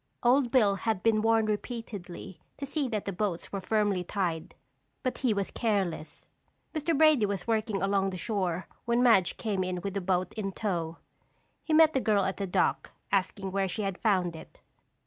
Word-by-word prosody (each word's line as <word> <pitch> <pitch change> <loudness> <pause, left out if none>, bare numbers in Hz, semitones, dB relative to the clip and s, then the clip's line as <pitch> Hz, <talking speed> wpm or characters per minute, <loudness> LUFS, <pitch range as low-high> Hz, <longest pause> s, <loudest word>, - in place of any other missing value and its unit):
Old 250 +1 +4
Bill 215 -6 +3
had 220 -3 -1
been 220 -2 +3
warned 225 0 +3
repeatedly 205 -6 -5 0.2
to 280 - -4
see 280 0 -1
that 215 -4 -3
the 200 - -3
boats 180 -2 -2
were 195 - -3
firmly 205 -2 +1
tied, 175 -4 -3 0.5
but 255 - -2
he 255 -4 +2
was 200 -2 -1
careless. 195 -9 -2 0.5
Mr. 310 0 0
Brady 305 -8 +5
was 195 -3 -3
working 220 -3 0
along 195 0 +2
the 185 - -5
shore 185 -4 -2 0.2
when 235 +1 +2
Madge 220 -7 +4
came 200 -4 -1
in 180 -1 -2
with 200 0 -4
the 200 - -2
boat 180 0 0
in 195 -3 -4
tow. 170 -6 -2 0.7
He - - -5
met 315 0 +6
the 265 - +1
girl 205 -3 +2
at 190 - -2
the 195 - -2
dock, 180 - 0 0.2
asking 195 0 0
where 195 0 0
she 210 +4 -3
had 195 -2 -3
found 185 -6 +1
it. 160 - -12
200 Hz, 185 wpm, -29 LUFS, 185-225 Hz, 0.7 s, met